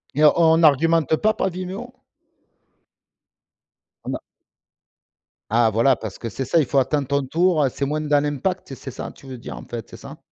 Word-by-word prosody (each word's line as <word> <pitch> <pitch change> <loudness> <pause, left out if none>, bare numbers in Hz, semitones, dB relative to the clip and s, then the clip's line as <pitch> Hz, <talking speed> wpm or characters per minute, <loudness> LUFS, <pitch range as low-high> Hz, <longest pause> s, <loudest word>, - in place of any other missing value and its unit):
Mais 150 - +2
on 165 0 +4
argumente 160 +1 +4
pas 215 0 +2
par 195 -3 -1
Vimeo? 185 +7 -6 2.1
On - - -3
a - - -5 1.3
Ah 115 0 +4
voilà, 115 +5 +3
parce 110 -4 -7
que 115 - -5
c'est 135 +5 -4
ça, 165 +6 +2
il 145 - +2
faut 140 - -1
attendre 135 +1 +1
ton 140 -1 0
tour, 165 +1 +2
c'est 140 - -2
moins 150 +2 -2
dans 145 -1 +2
l'impact, 150 +2 -3
c'est 130 0 -8
ça - - -7
tu 135 - -16
veux 130 -1 -7
dire, 75 - -8
en - - -9
fait, - - -7
c'est - - -11
ça? - - -11
145 Hz, 185 wpm, -22 LUFS, 130-165 Hz, 2.1 s, on